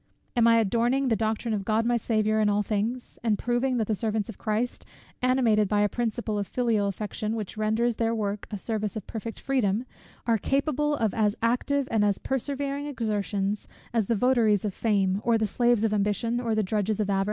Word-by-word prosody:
Am 235 -1 +4
I 230 0 +6
'adorning 240 +5 +2
the 225 - +3
doctrine 220 +2 -1
of 205 -2 -1
God 220 +2 +1
my 240 0 +2
Saviour 215 -2 +1
in 210 - +3
all 205 0 +2
things;' 220 +5 -3
and 220 -3 +2
proving 245 +3 0
that 225 - +1
the 215 - 0
servants 215 0 -1
of 225 - -8
Christ, 225 +2 -2 0.4
animated 245 -5 +3
by 205 +1 +2
a 205 - +3
principle 225 -1 -2
of 200 - -3
filial 230 -5 +1
affection, 210 +2 -3
which 215 -3 -5
renders 220 +2 +1
their 230 0 +1
work 205 -2 -3
a 210 - -4
service 215 +1 -3
of 215 - -5
perfect 225 0 -6
freedom, 240 -4 0 0.4
are 230 -2 +2
capable 295 +4 +1
of 220 -6 0
as 210 -2 +1
active 255 +4 +1
and 220 -2 +3
as 205 -1 +2
persevering 280 +2 -2
exertions, 210 -5 -2 0.3
as 225 -4 +1
the 230 - +2
votaries 220 -3 +3
of 205 - -2
fame, 200 -3 +1
or 235 -1 +3
the 220 - +1
slaves 240 +1 +2
of 220 -1 +2
ambition, 210 +3 0
or 230 -3 -1
the 215 - +2
drudges 210 +1 -1
of 210 - +1
avarice?" 195 - +2
220 Hz, 205 wpm, -27 LUFS, 210-240 Hz, 0.4 s, I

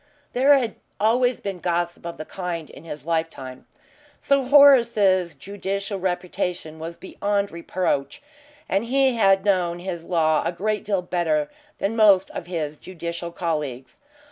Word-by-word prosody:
There 275 +3 +5
had 235 -5 -2 0.2
always 245 +3 +2
been 195 -3 -4
gossip 175 -1 -2
of 170 - -7
the 155 - -6
kind 175 -4 -5
in 140 - -13
his 150 -3 -8
life 165 -1 0
time. 130 -4 -10 0.5
Sir 275 -1 +2
Horace's 235 - +5
judicial 200 0 -4
reputation 180 -3 -3
was 165 +1 -7
beyond 200 +1 -2
reproach 170 - -2 0.5
and 195 +4 0
he 265 +1 +3
had 195 -4 +3
known 180 -4 +1
his 175 -2 -5
law 160 -3 +2
a 170 - -1
great 210 +4 -2
deal 195 -3 -1
better 165 -4 0 0.3
than 200 +3 -1
most 205 -4 +5
of 170 - -7
his 155 -4 -3
judicial 170 -1 -6
colleagues. 150 -7 -4
180 Hz, 145 wpm, -23 LUFS, 170-205 Hz, 0.5 s, There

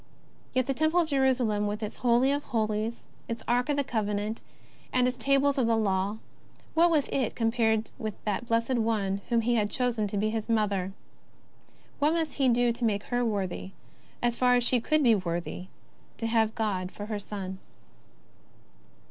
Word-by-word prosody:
Yet 255 -1 +3
the 270 - 0
Temple 315 +5 +2
of 320 - -2
Jerusalem, 250 -7 +2
with 210 +1 -3
its 210 - -5
Holy 245 +2 +3
of 285 +1 -1
Holies, 220 0 -2 0.2
its 230 0 -4
Ark 245 +4 +1
of 290 - +1
the 285 - +2
Covenant, 210 -2 -2 0.5
and 250 -1 +3
its 255 - -1
Tables 275 +1 +2
of 240 - +2
the 230 -1 +3
Law, 200 -1 0 0.6
what 335 +2 +5
was 305 -4 +2
it 260 -5 -1
compared 225 -1 +1
with 215 -4 -4
that 215 +3 -2
Blessed 230 +2 +1
One 205 -3 0
whom 235 -1 +3
He 240 +2 +1
had 210 -3 +1
chosen 240 -3 0
to 205 - -3
be 215 +2 +1
His 225 0 -3
Mother? 200 -4 +1 1.1
What 295 +2 +3
must 325 -2 -1
He 270 -3 +3
do 240 0 +3
to 235 +1 -5
make 205 -3 +1
her 245 0 +2
worthy, 195 -4 -2 0.5
as 240 -1 +2
far 250 0 +4
as 245 - +3
she 245 +1 +3
could 310 +4 +2
be 235 -3 +6
worthy, 180 -1 -3 0.5
to 230 - -4
have 225 -1 +2
God 190 -5 -1
for 205 - -7
her 210 -1 -3
Son 190 -2 -6
230 Hz, 180 wpm, -28 LUFS, 210-250 Hz, 1.1 s, be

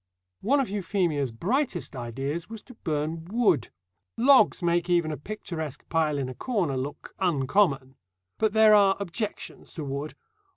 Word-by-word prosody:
One 275 +8 +3
of 270 - 0
Euphemia's 175 -8 0
brightest 190 - -1
ideas 135 - -4
was 225 -2 -8
to 250 - -14
burn 160 -4 -3
wood. 210 - +2 0.5
Logs 260 -5 +5
make 175 +1 +1
even 170 -3 +2
a - - -2
picturesque 160 -4 -6
pile 155 -3 +1
in 135 -2 -2
a 130 - -6
corner 185 - -1
look 130 +3 -5
"uncommon." 140 -4 +1 0.5
But 220 -2 +2
there 220 -1 +6
are 200 -2 +5
objections 200 +3 -5
to 160 - -4
wood. 140 +2 -4
170 Hz, 150 wpm, -27 LUFS, 145-210 Hz, 0.5 s, there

